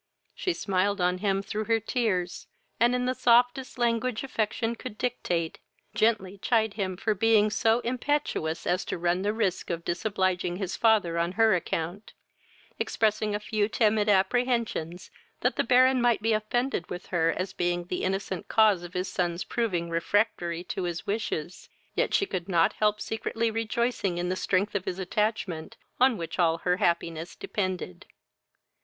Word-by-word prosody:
She 365 - -1
smiled 200 - 0
on 180 0 +1
him 195 -1 0
through 215 +2 -3
her 225 0 +2
tears, 210 -6 -1 0.3
and, 240 +2 +4
in 250 0 0
the 255 - +1
softest 245 +2 +3
language 235 0 0
affection 225 -2 -1
could 225 -2 -8
dictate, 175 -10 -2 0.3
gently 205 -3 +1
chid 220 -1 +1
him 190 -4 -3
for 215 +3 0
being 215 0 +3
so 225 +2 +2
impetuous 245 - -1
as 180 +2 +1
to - - -3
run 175 +1 +1
the 205 +2 +1
risk 210 -5 -1
of 170 -1 -3
disobliging 185 -1 0
his 185 -1 -3
father 205 -7 +3
on 170 +2 0
her 225 +1 +4
account, 175 +3 -3 0.7
expressing 215 -1 0
a - - -1
few 210 0 -1
timid 215 -1 +2
apprehensions 210 -4 0 0.3
that - - +1
the - - +1
Baron 255 0 +5
might 240 -3 +2
be 225 0 +3
offended 215 0 -1
with 180 - -6
her 165 -1 +3
as 185 +1 -3
being 175 -1 -1
the 180 +1 -3
innocent 190 -1 -2
cause 215 -5 +4
of 175 0 -10
his 180 +1 -1
son's 175 -1 -1
proving 185 -8 -1
refractory 170 0 0
to 180 0 -4
his 170 -2 -4
wishes; 190 -5 -3 0.2
yet - - 0
she 395 - +3
could 185 - -4
not 175 +3 +3
help 210 0 +1
secretly 225 +1 -2
rejoicing 225 -4 -1
in 175 0 -1
the 185 - 0
strength 190 +2 0
of 200 -3 -2
his 180 - -3
attachment, 190 -3 -2 0.2
on 255 -2 +4
which 170 +1 -6
all 165 -2 +3
her 180 +2 0
happiness 170 -3 -1
depended. 185 - -4
205 Hz, 165 wpm, -27 LUFS, 180-225 Hz, 0.7 s, Baron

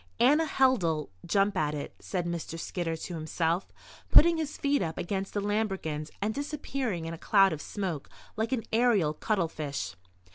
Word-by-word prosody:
"Anna 295 +7 +5
Held'll 175 - +2 0.2
jump 200 +2 +2
at 150 -4 0
it," 145 - -5
said 180 -3 -3
Mr. 170 -1 -4
Skidder 165 -1 -2
to 170 +2 -6
himself, 165 +2 -1 0.4
putting 335 +1 +7
his 310 -2 -3
feet 285 0 +1
up 160 -2 -2
against 195 +2 -3
the 205 - +1
lambrequins 195 -8 -1
and 215 +1 0
disappearing 275 - -3
in 165 - -4
a 165 - -8
cloud 195 -3 +5
of 155 - -5
smoke 180 -8 -4 0.3
like 220 +1 -1
an 245 -4 0
aerial 220 -10 +3
cuttlefish. 155 - -2
190 Hz, 160 wpm, -29 LUFS, 160-225 Hz, 0.4 s, putting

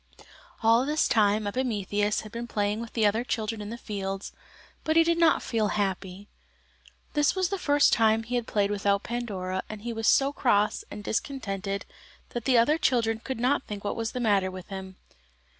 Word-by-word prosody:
All 230 +2 +5
this 300 +3 +1
time 210 -2 +3
Epimetheus 205 -3 -1
had 215 - -11
been 235 +2 -5
playing 210 0 -1
with 235 - -8
the 225 -2 +2
other 215 +3 +2
children 225 -2 -3
in 205 - -6
the 235 - -6
fields, 195 -3 -5 0.5
but 315 - 0
he 330 - +7
did 335 0 +1
not 330 -1 +4
feel 220 -3 0
happy. 195 -1 -3 0.9
This 295 +2 +2
was 370 -2 +1
the 395 - -2
first 290 -3 +4
time 225 -1 +3
he 235 +2 -7
had 240 -2 -1
played 205 -1 +1
without 200 0 +1
Pandora, 195 -6 -3
and 215 -1 -8
he 235 0 -3
was 225 -1 -2
so 275 +1 +4
cross 210 -7 +2
and 205 0 -8
discontented 200 -5 -3 0.4
that 240 -2 -5
the 255 -2 +4
other 295 +8 +4
children 230 -7 +1
could 260 +1 -5
not 255 +3 +1
think 205 -1 -6
what 205 - -2
was 225 -1 -3
the 250 - -3
matter 200 -5 +2
with 185 0 -9
him. 190 -1 -7
220 Hz, 190 wpm, -27 LUFS, 205-245 Hz, 0.9 s, he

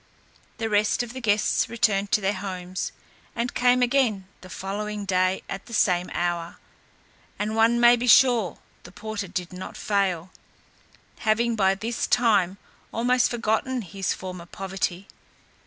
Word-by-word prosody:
The 225 - -2
rest 210 +2 +2
of 240 0 -8
the 260 - -7
guests 210 -2 +1
returned 210 -4 +1
to 210 - +3
their 195 +1 +1
homes, 185 -2 -5 0.4
and 240 +1 -2
came 250 0 +3
again 240 -7 +1
the 185 - -12
following 205 +2 -4
day 185 0 +1
at 195 - -7
the 235 - -5
same 180 -3 +2
hour, 175 -1 -2 0.8
and 210 +1 -2
one 230 +1 +4
may 240 0 +7
be 245 +1 -3
sure 240 -5 +5 0.2
the 175 - -13
porter 215 0 -5
did 180 0 -5
not 180 +1 -8
fail, 190 -4 -1 0.9
having 230 +1 +1
by 195 -2 +3
this 225 +4 -3
time 200 -6 +3 0.3
almost 245 +2 +2
forgotten 240 +2 -1
his 190 +1 -3
former 180 -2 -6
poverty. 190 0 -4
205 Hz, 145 wpm, -25 LUFS, 185-235 Hz, 0.9 s, may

